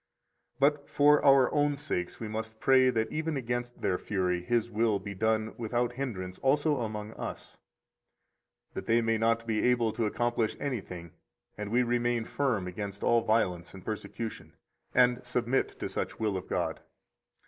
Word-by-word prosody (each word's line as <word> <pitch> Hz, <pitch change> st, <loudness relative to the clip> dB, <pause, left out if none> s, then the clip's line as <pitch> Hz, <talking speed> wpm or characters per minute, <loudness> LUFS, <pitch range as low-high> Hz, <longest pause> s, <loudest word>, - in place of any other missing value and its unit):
But 145 Hz, +1 st, +2 dB
for 145 Hz, +1 st, +5 dB
our 135 Hz, -2 st, +6 dB
own 145 Hz, -1 st, +2 dB
sakes 90 Hz, -10 st, -3 dB
we 115 Hz, -, -4 dB
must 110 Hz, 0 st, -5 dB
pray 130 Hz, 0 st, +5 dB
that 110 Hz, -3 st, 0 dB
even 155 Hz, -1 st, -1 dB
against 120 Hz, -1 st, -3 dB
their 90 Hz, -, +1 dB
fury 90 Hz, -3 st, -1 dB
His 120 Hz, +5 st, +1 dB
will 110 Hz, -2 st, +1 dB
be 100 Hz, +1 st, -6 dB
done 110 Hz, +2 st, 0 dB
without 120 Hz, +1 st, 0 dB
hindrance 100 Hz, -9 st, -5 dB
also 145 Hz, +2 st, +2 dB
among 110 Hz, -3 st, -4 dB
us, -, -, -7 dB, 1.1 s
that -, -, -6 dB
they 115 Hz, +1 st, +4 dB
may 115 Hz, -1 st, +1 dB
not 115 Hz, +1 st, +2 dB
be 110 Hz, -2 st, 0 dB
able 120 Hz, -3 st, +2 dB
to 115 Hz, -2 st, 0 dB
accomplish 120 Hz, 0 st, 0 dB
anything 95 Hz, -, -5 dB, 0.4 s
and 105 Hz, -1 st, -5 dB
we 120 Hz, +3 st, +3 dB
remain 120 Hz, -1 st, 0 dB
firm 125 Hz, -10 st, 0 dB
against 100 Hz, +2 st, -6 dB
all 120 Hz, 0 st, +4 dB
violence 95 Hz, -6 st, 0 dB
and 95 Hz, -, -12 dB
persecution, 105 Hz, -7 st, -5 dB, 0.4 s
and 125 Hz, 0 st, +4 dB
submit 125 Hz, +1 st, 0 dB
to -, -, -2 dB
such -, -, -4 dB
will 105 Hz, -3 st, 0 dB
of 95 Hz, -, -5 dB
God. -, -, -1 dB
115 Hz, 160 wpm, -30 LUFS, 105-125 Hz, 1.1 s, our